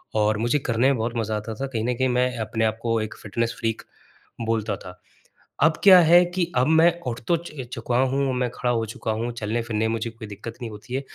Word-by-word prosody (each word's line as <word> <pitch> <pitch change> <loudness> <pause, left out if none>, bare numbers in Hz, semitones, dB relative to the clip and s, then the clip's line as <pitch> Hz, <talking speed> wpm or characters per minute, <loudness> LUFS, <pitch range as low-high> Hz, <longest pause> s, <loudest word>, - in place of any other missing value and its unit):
और 105 0 +2
मुझे 120 +6 +1
करने 120 0 +1
में 135 - 0
बहुत 115 +2 -2
मज़ा 110 -1 -1
आता 110 +2 -5
था। 135 +4 -3
कहीं 115 -4 -3
न 125 - +1
कहीं 130 +1 +2
मैं 125 0 +1
अपने 110 +1 -1
आप 110 0 0
को 115 -1 0
एक 110 0 -5
फ़िटनेस 115 +3 -2
फ्रीक 115 -1 -2 0.7
बोलता 110 -2 -1
था। 90 -1 -12 0.6
अब 160 0 +4
क्या 190 -2 +10
है 175 +2 +6
कि 175 -2 0
अब 125 - +3
मैं 160 +2 +5
उठ 120 -1 -3
तो 170 - +4
च 150 -6 -8
चुका 120 -1 -2
हूँ, 135 +1 +1
अब 130 - 0
मैं 125 -1 0
खड़ा 125 -1 -1
हो 115 -1 0
चुका 110 0 -5
हूँ, 120 +2 -2
चलने-फिरने 110 0 -2
में - - -1
मुझे 115 0 -2
कोई 110 -2 -10
दिक्कत 105 +3 -8
नहीं 115 - -4
होती 105 +4 -9
है, 135 - 0
115 Hz, 240 wpm, -24 LUFS, 110-130 Hz, 0.7 s, क्या